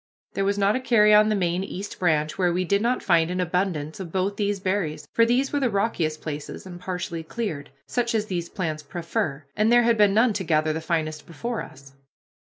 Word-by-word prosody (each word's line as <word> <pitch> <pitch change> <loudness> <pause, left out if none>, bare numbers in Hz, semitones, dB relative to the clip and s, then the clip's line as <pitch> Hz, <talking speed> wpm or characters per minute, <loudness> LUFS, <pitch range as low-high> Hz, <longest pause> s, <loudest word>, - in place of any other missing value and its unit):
There 195 - 0
was 200 +1 +1
not 200 +1 +3
a - - +1
carry 215 -5 +4
on 210 +1 +6
the 215 - +2
main 180 -1 0
East 195 +1 -7
Branch 155 -3 +1
where 180 -2 +2
we 180 +2 0
did 200 +3 +2
not 240 +3 0
find 165 -3 +3
an 180 +1 -2
abundance 180 -3 -1
of 180 -4 -6
both 190 +2 0
these 205 -1 -1
berries, 185 -5 -2
for 230 0 +4
these 260 +4 +1
were 290 - +2
the 260 -3 +1
rockiest 190 -7 -1
places 150 +2 -6
and 175 -2 -9
partially 180 -2 -4
cleared, 160 -5 -5 0.2
such 240 -1 -1
as 215 -1 +1
these 175 -4 -3
plants 160 -6 -3
prefer, 150 -2 -3
and 215 +2 +2
there 240 0 +6
had 230 -1 +2
been 205 -1 +5
none 225 +1 +4
to 195 -1 -2
gather 155 -2 +1
the 160 - -3
finest 155 -2 -2
before 230 +8 -4
us. 135 0 -12
185 Hz, 220 wpm, -25 LUFS, 160-210 Hz, 0.2 s, on